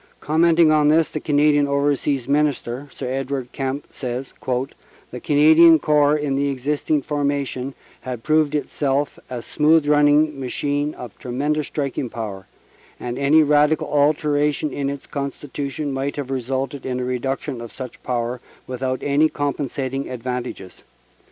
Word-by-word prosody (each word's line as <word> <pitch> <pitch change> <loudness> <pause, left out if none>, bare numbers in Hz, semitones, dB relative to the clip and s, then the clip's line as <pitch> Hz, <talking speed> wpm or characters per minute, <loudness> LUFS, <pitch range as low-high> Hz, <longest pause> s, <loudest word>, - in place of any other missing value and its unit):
Commenting 165 +1 +4
on 150 -1 +4
this, 155 +1 +4
the 155 - -3
Canadian 145 -1 +3
Overseas 140 -2 0
Minister, 140 -2 0
Sir - - -6
Edward 130 -1 -3
Kemp, 135 +1 -3
says: 125 0 -5 0.8
"The 125 - -6
Canadian 160 +4 +6
Corps 150 -1 +3
in 145 -2 -1
the 140 +1 +1
existing 145 +2 -1
formation 140 -2 -2 0.2
had 125 -3 -6
proved 155 -1 +2
itself 145 -1 -1
a 120 -2 -5
smooth 155 0 +3
running 150 0 +4
machine 145 +3 -2
of 120 -4 -10
tremendous 145 +4 -1
striking 140 -3 -3
power, 100 -5 -6 0.5
and 125 +1 -4
any 150 +3 +5
radical 150 +1 +3
alteration 150 0 +1
in 140 -1 -2
its 140 -1 -6
constitution 140 +1 -4
might 135 +1 -2
have 140 -2 -5
resulted 135 +2 -3
in 125 -1 -3
a 125 - -2
reduction 130 +1 -3
of 120 - -8
such 130 -2 -9
power 120 0 -2 0.2
without 130 0 -3
any 145 +2 +3
compensating 140 -2 -3
advantages. 125 -6 -5
140 Hz, 140 wpm, -21 LUFS, 130-150 Hz, 0.8 s, Canadian